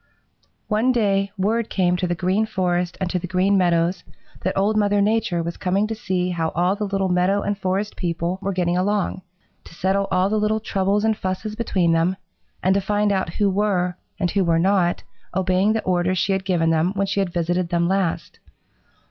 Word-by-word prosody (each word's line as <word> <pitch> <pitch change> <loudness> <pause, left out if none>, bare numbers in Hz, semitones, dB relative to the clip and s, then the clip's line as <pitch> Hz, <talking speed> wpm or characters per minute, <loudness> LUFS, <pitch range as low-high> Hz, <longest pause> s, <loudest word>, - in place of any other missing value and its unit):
"One 220 +4 +2
day 200 -4 +1
word 220 +4 0
came 180 -2 +1
to 180 0 -1
the 175 - -1
Green 185 +5 0
Forest 180 -3 -1
and 190 - -1
to 180 - 0
the 180 - -6
Green 185 +3 +2
Meadows 175 -1 +1 0.4
that 185 - -2
Old 205 +3 +2
Mother 205 -1 +2
Nature 205 -4 +1
was 170 +1 -5
coming 190 +3 0
to 220 - -3
see 185 -5 -2
how 165 -2 -1
all 180 +3 +2
the 210 0 -3
little 195 -1 0
meadow 185 +3 +1
and 205 - -1
forest 195 +2 -2
people 170 +1 -2
were 195 - -1
getting 175 -2 0
along, 195 +1 0 0.4
to - - -14
settle 195 +2 0
all 185 +1 +2
the 215 +2 0
little 215 +1 +1
troubles 200 -1 0
and 220 -1 +2
fusses 200 +2 -4
between 190 -7 +1
them, 165 +3 +2 0.5
and 185 - +4
to 200 - +1
find 205 +1 +1
out 190 -4 -1
who 205 - +2
were 190 -3 0 0.2
and 180 -4 0
who 195 -1 +1
were 165 -2 +2
not 180 0 +2 0.3
obeying 190 +2 +2
the 220 - -1
orders 185 0 +1
she 195 - +1
had 190 -1 -1
given 170 -3 +1
them 165 +4 +1
when 195 0 +1
she 195 +1 -1
had 195 -2 0
visited 175 0 -1
them 170 -1 +1
last. 175 -4 -1
190 Hz, 205 wpm, -22 LUFS, 180-200 Hz, 0.5 s, and